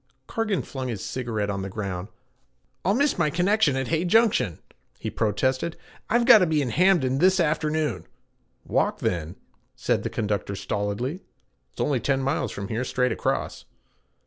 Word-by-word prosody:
Cargan 215 0 -1
flung 130 -2 -5
his 110 -6 -4
cigarette 110 -5 -2
on 100 -1 -3
the 95 - -4
ground. 95 -2 -4 0.8
'I'll 195 +4 +2
miss 280 -4 +1
my 155 -3 +3
connection 180 -2 +2
at 130 -1 -2
Hay 165 0 +1
Junction!' 180 - +3 0.4
he - - -5
protested. 130 - 0 0.3
'I've 240 +1 +3
gotta 220 -7 +8
be 155 -1 +2
in 130 -4 -1
Hamden 160 -7 +3
this 185 +3 +4
afternoon.' 150 - 0 0.6
'Walk - - +1
then,' 85 0 -2 0.4
said - - 0
the - - -3
conductor 105 -2 -2
stolidly. 105 - -2 0.5
'It's - - -6
only 140 -4 +1
ten 135 +4 +1
miles 135 -4 -1
from 100 0 -6
here 115 +3 -1
straight 125 0 0
across.' - - -2
130 Hz, 155 wpm, -25 LUFS, 105-175 Hz, 0.8 s, gotta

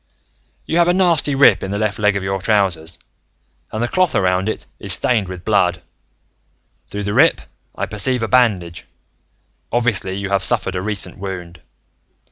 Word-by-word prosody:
"You 165 - 0
have 170 - +4
a 175 - +3
nasty 170 -6 +2
rip 140 +1 +5
in 95 - -4
the 100 - -2
left 105 0 -2
leg 105 -1 +2
of 100 - -2
your 95 0 -2
trousers, 95 -6 0 0.7
and 110 +2 -2
the - - 0
cloth 185 +4 +1
around 95 +1 +1
it - - -5
is - - +1
stained 110 -6 +1
with 90 -1 -9
blood. 90 -5 +2 1.1
Through 105 0 -5
the 100 0 -2
rip, 150 +8 +4 0.4
I - - -2
perceive 115 +3 -1
a - - 0
bandage. 100 -10 +1 0.8
Obviously, 110 -6 0
you 100 -1 -4
have 100 -1 +1
suffered 95 - +1
a 90 - -2
recent 100 -1 -3
wound. 90 -3 -7
100 Hz, 170 wpm, -19 LUFS, 95-120 Hz, 1.1 s, rip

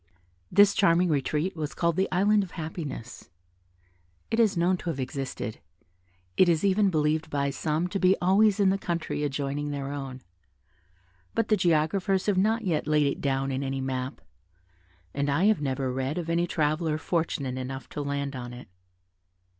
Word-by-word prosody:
This 200 +1 +6
charming 175 -2 +3
retreat 150 +4 0
was 155 -2 -4
called 170 -1 +1
the 190 +2 +1
"Island 205 +3 +3
of 190 -3 -6
Happiness." 155 -7 -6 1.0
It 225 - +1
is 215 -5 +3
known 175 +2 +3
to 175 - -5
have 150 -5 -3
existed; 130 -4 -4 0.8
it 185 - +6
is 165 +2 +2
even 200 +1 +3
believed 155 -1 0
by 140 -2 0
some 155 +4 -1
to 195 - -2
be 185 +1 +4
always 200 +3 +4
in 195 -2 +4
the 195 - 0
country 170 -4 -3
adjoining 145 +1 -2
their 140 -1 -4
own; 135 -3 -6 1.1
but 225 - 0
the 215 - +5
geographers 180 +3 +1
have 205 - +2
not 220 +3 +2
yet 165 -7 -1
laid 150 -1 +3
it 140 - -1
down 135 -1 0
in 135 +1 -2
any 135 0 -2
map, 130 0 -3 0.9
and 140 0 -1
I 145 +6 +1
have 215 -6 +3
never 130 -2 -1
read 130 +4 -2
of 165 -1 -2
any 170 +1 +1
traveller 155 0 0
fortunate 150 -6 -2
enough 130 -1 -6
to 150 - -5
land 140 -1 -3
on 125 -1 -6
it. 125 -5 -11
155 Hz, 170 wpm, -27 LUFS, 140-185 Hz, 1.1 s, This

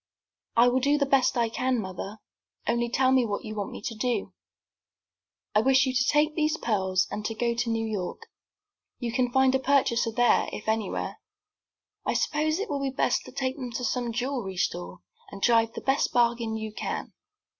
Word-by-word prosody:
"I 235 +1 +7
will 250 +1 +3
do 285 +3 +3
the 280 - +2
best 270 -2 +3
I 235 -1 +3
can, 250 +2 0
mother. 195 +1 -6 0.5
Only 235 0 +1
tell 260 +2 +3
me 260 -1 +4
what 210 +1 -3
you 215 - -5
want 205 -2 -3
me - - -9
to 230 - -3
do." 240 +2 -2 1.2
"I 210 - +4
wish 270 +3 +4
you 260 - -1
to 260 0 +3
take 300 +1 +3
these 310 0 +1
pearls, 190 -5 +1
and 210 - -4
go 235 0 +1
to 235 0 -1
New 225 0 0
York. 205 -5 -4 0.7
You 240 -2 -3
can 245 0 +1
find 265 0 +4
a 265 - +3
purchaser 260 -4 +2
there, 245 +1 +3
if 210 - -7
anywhere. 220 -2 -2 0.8
I - - -1
suppose 310 +1 +1
it 410 - -2
will 285 -2 -2
be 275 - 0
best 265 - 0
to - - -10
take 260 +1 -2
them 250 -3 -5
to 250 - -3
some 245 -1 -1
jewelry 240 -5 -3
store, 90 - -2 0.3
and 200 - -9
drive 230 +1 +3
the - - -6
best 270 +1 +1
bargain 235 -2 +1
you 220 -1 -5
can." - - -4
240 Hz, 195 wpm, -27 LUFS, 220-265 Hz, 1.2 s, I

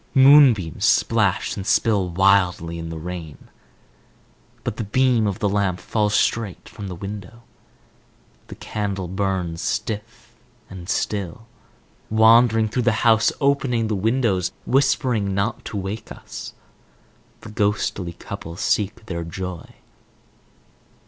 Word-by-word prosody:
Moonbeams 130 - +6
splash - - +2
and 95 0 -6
spill 100 -2 +2
wildly 90 -2 +2
in 80 0 -6
the 80 - -6
rain. 85 -2 -8 1.1
But - - -4
the - - -2
beam 120 +1 +2
of 100 - -2
the 105 - 0
lamp 100 -2 0
falls 105 -2 0
straight 110 -6 0
from 105 -3 -8
the 90 - -6
window. 100 +4 -8 1.0
The - - -9
candle 100 -3 -4
burns 95 -3 -2
stiff 110 +2 -4 0.4
and 95 -1 -9
still. 105 +2 -2 0.6
Wandering 110 0 +5
through 120 +4 -1
the 110 +1 -1
house, 110 -1 +5
opening 135 -5 +1
the 110 - 0
windows, 105 -3 0
whispering 125 -7 +1
not 100 +3 -1
to 105 - -5
wake 100 +3 -5
us, - - -9 0.9
the - - -10
ghostly 100 -4 -1
couple 85 0 -8
seek 105 +4 -1
their 85 -5 -4
joy. 90 0 -6
100 Hz, 120 wpm, -22 LUFS, 90-115 Hz, 1.1 s, Moonbeams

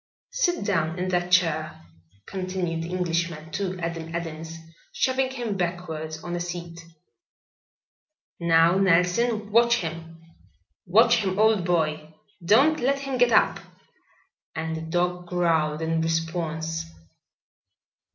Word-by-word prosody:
"Sit 355 - 0
down 165 -5 0
in 185 +1 -2
that 180 -1 -1
chair," 160 -3 +2 0.5
continued 185 -3 -3
the 165 - -5
Englishman 170 -3 -2
to 185 +2 -3
Adam 165 -1 -4
Adams, 165 -1 -5 0.3
shoving 260 0 0
him 240 -6 -4
backward 170 -3 -4
on 175 0 -4
a - - -2
seat. 170 -1 -6 1.6
"Now, 170 +2 +4
Nelson, 195 +4 +2
watch 235 +2 +5
him. 165 -4 -6 0.7
Watch 230 +6 +5
him, 195 -4 -1
old 215 -4 +3
boy. 155 -3 -1 0.3
Don't 270 - +4
let 275 +3 +1
him 270 -2 -3
get 245 -1 +4
up." - - +3 1.0
And 160 0 -3
the 160 - -5
dog 175 +2 -1
growled 165 -3 +1
in 160 0 0
response. 165 0 -2
175 Hz, 120 wpm, -25 LUFS, 165-195 Hz, 1.6 s, watch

